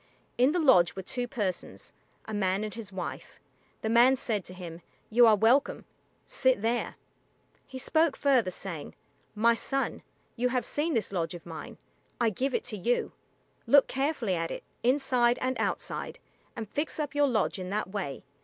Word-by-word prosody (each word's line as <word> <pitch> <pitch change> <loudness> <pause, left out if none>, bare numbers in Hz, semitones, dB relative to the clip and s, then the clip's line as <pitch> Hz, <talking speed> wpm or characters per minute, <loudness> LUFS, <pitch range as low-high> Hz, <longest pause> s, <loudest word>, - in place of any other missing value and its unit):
In 255 +4 +4
the 350 - 0
lodge 260 - +5
were 190 - -5
two 245 +5 -3
persons, 205 -8 -4 0.3
a 220 - -7
man 195 0 0
and 215 - -4
his 225 -3 -8
wife. 185 -2 -6 0.4
The 220 - 0
man 240 +3 +6
said 220 -6 -2
to 185 - -9
him, 175 -2 -8 0.3
"You 235 +1 +7
are 220 - +7
welcome; 230 +7 +2 0.4
sit 260 -6 +1
there." 235 +2 0 0.7
He 260 - -8
spoke 315 +3 +1
further, 260 -8 +3
saying, 175 -4 -7 0.4
"My 230 +2 +4
son, 270 +4 -2 0.3
you 250 +1 +1
have 250 0 0
seen 310 +2 -1
this 215 -3 -1
lodge 170 -2 -2
of 170 - -11
mine; 165 -2 -8 0.4
I 235 -2 +3
give 260 +6 -1
it - - 0
to 215 - -5
you. 235 +6 0 0.6
Look 285 -1 +7
carefully 270 -7 -1
at 165 -1 -1
it, - - -6 0.2
inside 250 -2 +3
and 260 +1 -1
outside, - - -3 0.4
and 225 -2 -5
fix 295 +8 -3
up 295 -2 -2
your 290 0 +3
lodge 215 -6 0
in 185 0 -5
that 205 0 -2
way. 190 -10 -4
235 Hz, 175 wpm, -29 LUFS, 195-260 Hz, 0.7 s, You